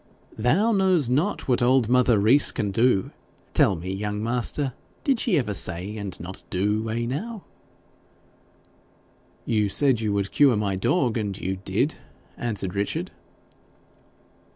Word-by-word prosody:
'Thou 160 - +2
knows 190 - +2
not 155 +11 0
what 125 -2 +2
old 125 -1 +3
mother 125 -2 +3
Rees 115 +8 +4
can 105 -2 -2
do. 115 -2 +2 0.4
Tell 95 - +3
me, 90 +3 -5
young 105 +1 -3
master, 125 +3 -1 0.3
did 275 -7 +1
she 210 -8 +1
ever 120 -7 -1
say 90 +2 0
and 100 -3 -5
not 90 +3 -7
do 105 +4 -1
eh, 115 +1 -2
now?' 200 - -5 2.0
'You 105 -3 +1
said 130 +1 +2
you 110 -2 -1
would 100 -1 -1
cure 140 -5 +4
my 100 -2 -1
dog, 120 - +1
and 100 -3 -3
you 95 +1 -3
did,' 95 - -1 0.4
answered 105 -6 -3
Richard. 100 -2 -2
110 Hz, 140 wpm, -24 LUFS, 100-135 Hz, 2.0 s, Rees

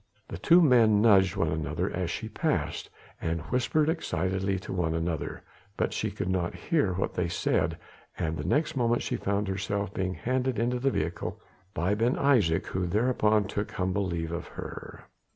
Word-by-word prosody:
The - - -6
two 175 +2 +6
men 115 -7 +5
nudged 100 -4 +5
one 80 - +1
another 75 -1 -2
as - - -2
she - - -4
passed, - - -2 0.3
and 80 0 -1
whispered 130 +5 +2
excitedly 95 - -1
to - - -6
one 85 -3 0
another, 80 -2 -3 0.3
but - - 0
she - - -1
could - - -4
not 90 -2 -1
hear 145 - +1
what 95 - -2
they 90 - 0
said, 85 - 0 0.4
and 80 0 -1
the 75 - -4
next 150 - +1
moment 120 -2 +1
she - - -2
found 100 +1 -1
herself 100 0 -2
being 95 0 -2
handed 130 0 -1
into 120 +3 0
the 135 +2 +2
vehicle 85 -8 -3 0.4
by 90 +6 +1
Ben 115 +4 +2
Isaje, 115 -13 +3
who 90 -1 -2
thereupon 105 +1 +2
took 105 0 -3
humble 95 +2 0
leave 85 -2 -3
of 85 +1 -4
her. - - -8
100 Hz, 175 wpm, -28 LUFS, 85-120 Hz, 0.4 s, two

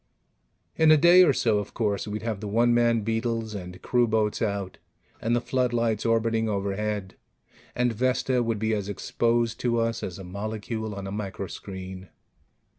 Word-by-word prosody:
In 160 -1 +5
a 155 - +8
day 175 +4 +7
or 160 - +5
so, 110 -5 +2
of 105 - -7
course, 105 -3 -1
we'd 105 +1 -4
have 110 -3 -2
the 105 - -5
one 120 +3 +3
man 120 -1 +3
beetles 115 0 -2
and 90 -2 -7
crewboats 110 -4 +1
out, 100 -4 -2 0.4
and 115 +1 +1
the - - +2
floodlights 120 -4 0
orbiting 115 -1 +1
overhead, 100 0 -2 0.6
and 125 -1 +1
Vesta 130 +2 +1
would 115 -2 -1
be 110 +1 0
as 100 -2 -2
exposed 115 +3 0
to 120 -1 0
us 115 0 0
as 90 - -5
a 95 - -8
molecule 110 +3 -4
on 100 -1 -6
a 95 - -5
microscreen. 95 -2 -6
110 Hz, 165 wpm, -26 LUFS, 100-120 Hz, 0.6 s, a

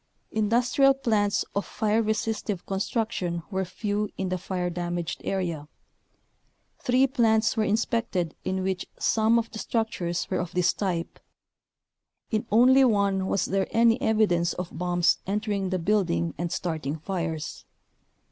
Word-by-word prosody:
Industrial 245 +5 +3
plants 215 -6 +1
of 200 - +1
fire 220 +1 0
resistive 215 -3 -2
construc 210 +3 -1
tion 170 -2 -3
were 190 0 0
few 205 +3 -2
in 190 -1 -2
the 185 - -1
fire 180 -1 -2
damaged 175 -1 -3
area. 170 -6 -2 1.1
Three 255 +2 +3
plants 225 -5 +2
were 220 -2 +1
inspected 215 -6 0
in 190 0 -1
which 190 -1 -2
some 225 +1 +3
of 230 0 -1
the 220 - -7
structures 210 -8 -2
were - - -1
of 175 -1 -4
this 180 0 +2
type. 175 -4 -3 1.1
In 220 +1 -1
only 255 +5 +6
one 200 -5 +2
was 195 - +1
there 195 0 0
any 230 +1 +3
evidence 200 -6 +2
of 180 -1 -6
bombs 175 -1 +2
entering 205 -1 -1
the 185 - 0
build 200 +2 +1
ing 85 0 -1
and 170 -1 -3
starting 160 -3 -3
fires. 165 -2 -4
200 Hz, 145 wpm, -26 LUFS, 175-220 Hz, 1.1 s, only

